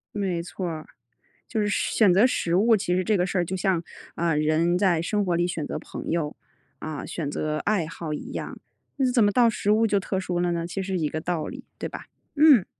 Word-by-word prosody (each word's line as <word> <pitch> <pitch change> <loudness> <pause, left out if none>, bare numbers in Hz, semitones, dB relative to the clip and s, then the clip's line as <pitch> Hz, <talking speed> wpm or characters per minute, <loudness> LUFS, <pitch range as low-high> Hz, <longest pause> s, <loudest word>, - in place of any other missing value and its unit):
没 190 -4 -1
错 180 +1 -5
儿， 155 -1 -6 0.6
就 225 - -2
是 210 - +1
选 210 -1 +3
择 200 +6 +6
食 170 -8 -1
物， 220 +4 +5
其 180 -2 0
实 185 - +1
这 210 +3 +2
个 180 - +2
事 185 0 -1
儿 175 - +1
就 190 - -3
像， 180 -2 +1 0.3
呃， 165 -2 +1
人 155 +3 +2
在 180 -4 +2
生 205 +4 0
活 175 -2 +1
里 175 +1 +1
选 165 -4 -3
择 - - -4
朋 - - -7
友， 155 -3 -1 0.4
啊， 155 -2 -5
选 155 -5 -4
择 155 0 -2
爱 205 -3 +1
好 165 -2 -5
一 - - -6
样， - - -5 0.4
那 260 -2 +2
怎 240 -3 +4
么 205 - +4
到 235 +2 +5
食 210 -1 0
物 220 +2 +4
就 200 -1 +2
特 190 0 -2
殊 180 -2 -2
了 175 0 +1
呢？ 170 0 -2
其 195 +3 -3
实 190 0 -2
一 150 - 0
个 155 - -3
道 165 -1 -2
理， - - -8
对 - - -3
吧？ - - -8 0.3
嗯。 290 - +7
180 Hz, 255 characters per minute, -25 LUFS, 170-205 Hz, 0.6 s, 嗯